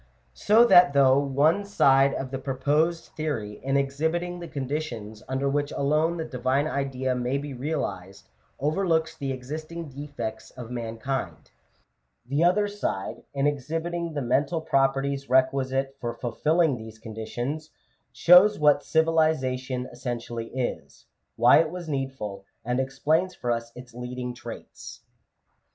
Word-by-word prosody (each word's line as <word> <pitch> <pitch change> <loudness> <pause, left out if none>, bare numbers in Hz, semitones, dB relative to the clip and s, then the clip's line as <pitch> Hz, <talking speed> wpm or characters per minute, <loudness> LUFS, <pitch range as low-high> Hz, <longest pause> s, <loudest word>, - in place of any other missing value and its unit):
So 220 - +5
that 180 -8 +7
though 135 -1 +5
one 145 +7 +2
side 140 -8 +4
of 130 -1 -4
the 135 - -3
proposed 150 +5 0
theory, 115 -10 -4
in 135 +1 +1
exhibiting 160 +6 -1
the 170 - -7
conditions 130 -7 -4
under 135 +1 -1
which 145 +1 0
alone 155 +4 +1
the 160 - -3
Divine 130 0 0
Idea 135 -3 -1
may 125 +2 -1
be 145 0 -5
realized, 100 - -4 0.3
overlooks 160 +2 +1
the 135 -2 -3
existing 155 +5 -6
defects 130 -6 -6
of 120 -1 -8
mankind; 120 +2 -4 0.7
the 140 +6 0
other 205 +4 +3
side, 205 - -4
in 140 0 +1
exhibiting 165 +4 -2
the 145 - -1
mental 145 +7 +1
properties 135 -2 0
requisite 135 +1 +1
for 120 -1 -3
fulfilling 150 +4 +1
these 110 -1 -10
conditions, 120 +8 -5 0.4
shows 180 +5 +6
what 145 -1 +4
civilization 135 -6 +1
essentially 120 -2 -5
is; 130 0 -5 0.3
why - - +6
it 160 - +2
was 175 0 -7
needful; 135 -9 -4 0.2
and 125 +2 0
explains 155 +7 0
for 120 - -2
us 115 0 -2
its 125 -1 -11
leading 125 0 -5
traits. 120 -2 -10
135 Hz, 135 wpm, -26 LUFS, 125-155 Hz, 0.7 s, that